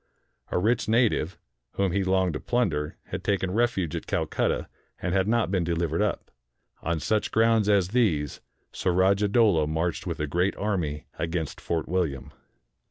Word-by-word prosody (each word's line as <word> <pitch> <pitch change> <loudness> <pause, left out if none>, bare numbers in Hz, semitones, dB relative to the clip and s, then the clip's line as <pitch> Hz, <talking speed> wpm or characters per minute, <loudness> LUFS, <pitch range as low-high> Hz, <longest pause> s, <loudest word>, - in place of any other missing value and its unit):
A - - -1
rich 110 +6 +1
native, 110 -7 +2 0.4
whom 100 -2 0
he 100 +2 +1
longed 95 -2 +2
to 75 - -3
plunder, 85 -12 -1
had - - -4
taken 95 -2 0
refuge 100 -7 0
at - - -5
Calcutta, - - 0 0.3
and 90 0 -2
had 95 0 +2
not 115 -3 +1
been 95 -3 +1
delivered 85 0 0
up. 105 -1 -1 0.5
On 85 -1 -1
such 105 +7 0
grounds 110 -2 +3
as 100 -3 +3
these 90 - +1 0.3
Surajah 95 +3 +2
Dowlah 100 -8 +3
marched 80 +3 -2
with 85 -2 -3
a 75 - 0
great 90 +6 0
army 85 -8 -2
against 80 -2 -3
Fort 80 -3 -2
William. 80 -7 -2
95 Hz, 160 wpm, -26 LUFS, 80-105 Hz, 0.5 s, grounds